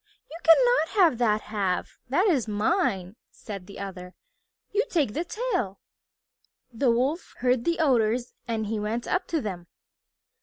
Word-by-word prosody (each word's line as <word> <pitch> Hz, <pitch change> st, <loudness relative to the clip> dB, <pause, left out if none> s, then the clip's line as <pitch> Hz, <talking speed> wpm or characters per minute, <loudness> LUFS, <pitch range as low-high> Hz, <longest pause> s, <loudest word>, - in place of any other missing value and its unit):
"You 325 Hz, -, -7 dB
cannot 435 Hz, +1 st, +4 dB
have 325 Hz, -10 st, +5 dB
that 215 Hz, -3 st, +2 dB
half. 195 Hz, -4 st, -2 dB
That 350 Hz, +10 st, +3 dB
is 285 Hz, -, +2 dB
mine," 210 Hz, -, 0 dB
said 195 Hz, -4 st, -9 dB
the 200 Hz, -, -10 dB
other. 185 Hz, -2 st, -7 dB, 0.6 s
"You 425 Hz, +2 st, +2 dB
take 290 Hz, -, +1 dB
the 325 Hz, -, -1 dB
tail." 365 Hz, -, -2 dB, 0.9 s
The 245 Hz, +3 st, +1 dB
Wolf 260 Hz, +9 st, 0 dB
heard 250 Hz, -1 st, +2 dB
the 335 Hz, 0 st, +1 dB
Otters 245 Hz, -5 st, +2 dB
and 225 Hz, -2 st, -1 dB
he 215 Hz, +1 st, -2 dB
went 220 Hz, +3 st, -3 dB
up 365 Hz, +1 st, 0 dB
to 325 Hz, -3 st, -1 dB
them. 180 Hz, -6 st, -5 dB
235 Hz, 150 wpm, -26 LUFS, 210-330 Hz, 0.9 s, have